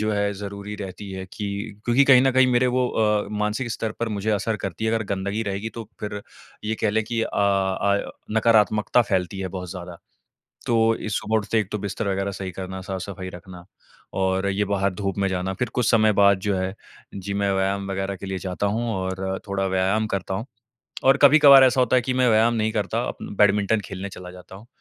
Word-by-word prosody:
जो 110 0 0
है 100 0 0
ज़रूरी 100 +1 -7
रहती 100 0 -7
है 95 0 -5
कि 105 -2 -4 0.4
क्योंकि 125 +4 +4
कहीं 130 -2 +7
न 135 - +4
कहीं 130 0 +5
मेरे 125 +1 +3
वो 125 0 +1
अ, 105 -2 +1
मानसिक 105 +4 -1
स्तर 110 -1 -3
पर 115 - 0
मुझे 105 +1 -2
असर 105 +2 -1
करती 95 +2 -5
है, 110 - +1
अगर 110 -1 -1
गंदगी 100 +3 -3
रहेगी 100 +2 -3
तो 115 -2 -7
फिर 105 0 -4 0.4
ये 110 +1 -1
कह 105 - +3
लें 110 +1 0
कि 115 0 -2
अ - - -2
अ, 100 0 +1 0.3
नकारात्मकता 110 +1 +3
फैलती 95 +1 0
है 95 - -3
बहुत 90 -1 -7
ज़्यादा। 90 -2 -8 0.7
तो 120 - +1 0.2
इ 110 - -6
सुबह 110 +2 -1
उठते 110 +1 -1
ही - - +4
एक 95 - -19
तो 105 - -1
बिस्तर 100 +1 -3
वग़ैरह 100 +1 -1
सही 95 -1 -6
करना, 95 +1 -6
साफ-सफाई 95 0 -6
रखना 90 0 -12 0.5
और 95 0 0
ये 100 +1 0
बाहर 100 -1 +1
धूप 100 -1 -3
में 100 - +2
जाना 95 +1 -2
फिर 125 - -1
कुछ 125 -2 +2
समय 110 -2 +4
बाद 100 -1 +4
जो 100 0 -1
है, 95 +1 -3 0.4
जी, 100 +1 -5
मैं 100 0 0
व्यायाम 95 +1 -1
वग़ैरह 95 0 -2
के - - -8
लिए 95 -1 -3
जाता 95 +2 -2
हूँ 115 -1 -1
और 95 0 -3
थोड़ा 95 0 -1
व्यायाम 95 +3 +1
करता 95 -1 -3
हूँ। 110 +5 -4 0.6
और 135 +1 +5
कभी-कभार 140 -2 +8
ऐसा 130 +1 +2
होता 125 0 +2
है - - +3
कि 130 - -1
मैं 125 -1 +2
व्यायाम 115 +2 +4
नहीं 110 0 0
करता 110 +3 -1
उम, 100 - -8
बैडमिंटन 105 +1 +3
खेलने 95 +1 -6
चला 90 -1 -10
जाता 90 +1 -13
हूँ 110 +5 -14
100 Hz, 220 wpm, -23 LUFS, 95-110 Hz, 0.7 s, कभी-कभार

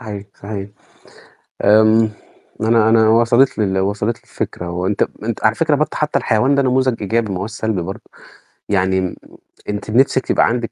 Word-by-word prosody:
صحيح، 105 -4 -7
صحيح. 100 -1 -7 1.0
آمم 110 +1 +5 0.5
أنا 110 0 +3
أنا 110 -1 +4
وصَلت 120 +3 +3
لي 110 - +1
ال 95 0 -1
وصَلت 105 +4 -1
لي - - -29
الفكرة 90 0 -5
وأنت 90 +3 -2 0.2
أنت 115 0 -4
على 110 0 +3
فكرة 155 +1 +1
برضو 150 +2 0
حتى 150 0 0
الحيوان 130 +6 +1
ده 140 - +2
نموذج 130 -3 +1
إيجابي 110 +1 -1
ما 90 - -3
هوّاش 100 +4 -5
سلبي 110 -5 -2
برضو، 95 +3 -7 0.7
يعني 95 -2 0 0.5
أنتِ 105 +1 -4
نفْسِك 130 +2 +2
يبقى - - +3
عندِك 120 -1 -2
110 Hz, 170 wpm, -18 LUFS, 100-120 Hz, 1.0 s, آمم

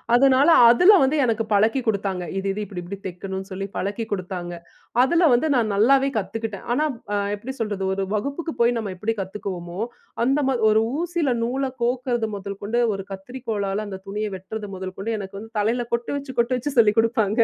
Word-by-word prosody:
அதனால 270 +2 +5 0.2
அதில 360 - +7
வந்து 285 +4 +2
எனக்கு 225 -2 +1
பழக்கி 220 +6 +3
கொடுத்தாங்க. 195 -3 0
இது 195 - -2
இது 210 - -4
இப்பிடி-இப்படி 190 0 -7
தைக்கணுன்னு 190 +2 -6
சொல்லி 195 +1 -4
பழக்கி 205 +3 -2
கொடுத்தாங்க. 180 -2 -4 0.5
அதில 335 +4 +4
வந்து 245 +6 +3
நான் 220 -4 +2
நல்லாவே 270 +6 +4
கத்துக்கிட்டேன். 215 +1 -4
ஆனா, 305 +5 +2 0.3
அ 205 - +2 0.2
எப்பிடி 245 +6 -7
சொல்றது, 205 -3 -2
ஒரு 195 - -1
வகுப்புக்கு 280 +8 -3
போய் 235 +1 +4
நம்ம 215 -4 -3
எப்பிடி 220 +4 -2
கத்துக்குவோம்மோ, 185 -1 -5 0.4
அந்தமா 270 0 +2
ஒரு 215 +1 +4 0.2
ஊசில 345 -5 0
நூல 260 +4 -1 0.2
கோக்கிறது 245 -1 0
முதல் 200 0 -7
கொண்டு 230 +4 0 0.2
ஒரு 195 - -6
கத்திரிக்கோலால 210 -1 -3
அந்த 190 -2 -6
துணிய 210 +2 -2
வெட்டுறது 205 +3 -7
முதல் 185 0 -6
கொண்டு 205 +4 -3
எனக்கு 195 0 -7
வந்து 225 +2 -11
தலையில 235 +3 +1
கொட்டு 235 0 -1
வச்சு, 280 -1 -6
கொட்டு 235 +2 +2
வச்சு 280 +4 -3
சொல்லிக் 210 -1 +4
கொடுப்பாங்க 225 -2 +2
220 Hz, 175 wpm, -23 LUFS, 195-250 Hz, 0.5 s, அதில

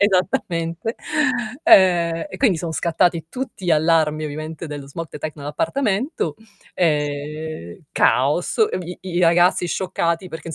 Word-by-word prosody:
Esattamente. 180 0 0 0.7
Ehm, 170 -3 +5
e - - -8
quindi 215 -11 +3
son 165 0 -4
scattati 170 0 +1
tutti 255 -7 -6
gli 175 - +3
allarmi 155 -1 +2
ovviamente 155 +2 -5
dello 145 -2 -7
smog 165 +4 -6
detect 155 0 -6
nell'appartamento 190 - -1 0.4
e 150 - -2
caos. 145 +7 +2 0.2
Vi 180 0 -7
i 180 -1 -1
ragazzi 175 +1 +4
scioccati 170 -1 -1
perché 165 -1 -8
165 Hz, 120 wpm, -21 LUFS, 155-180 Hz, 0.7 s, Ehm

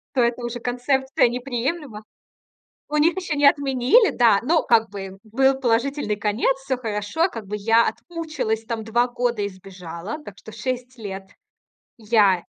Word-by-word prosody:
то 255 - +3
эта 240 +1 0
уже 240 0 -4
концепция 265 +2 +1
неприемлема. 250 0 -3 0.9
У 300 - -2
них 330 +4 +3
ещё 360 -5 -2
не 290 0 +4
отменили, 280 - +3
да. 225 -5 +4
Но 320 +6 +2
как 225 -2 +3
бы 195 -1 -8
был 265 +5 +2
положительный 240 -1 0
конец, 210 +5 +1
всё 270 -1 -2
хорошо. 225 - -1
Как 225 - -8
бы 210 +2 -4
я 225 +3 +3
отмучилась 310 -10 -4
там 225 -1 -4
2 240 +3 +1
года 245 -3 -1
и 200 - -1
сбежала. 185 - -8
Так 205 - -10
что 220 - -12
6 250 +3 -5
лет 195 -3 -6 0.7
я 210 -5 +3
240 Hz, 155 wpm, -23 LUFS, 210-270 Hz, 0.9 s, не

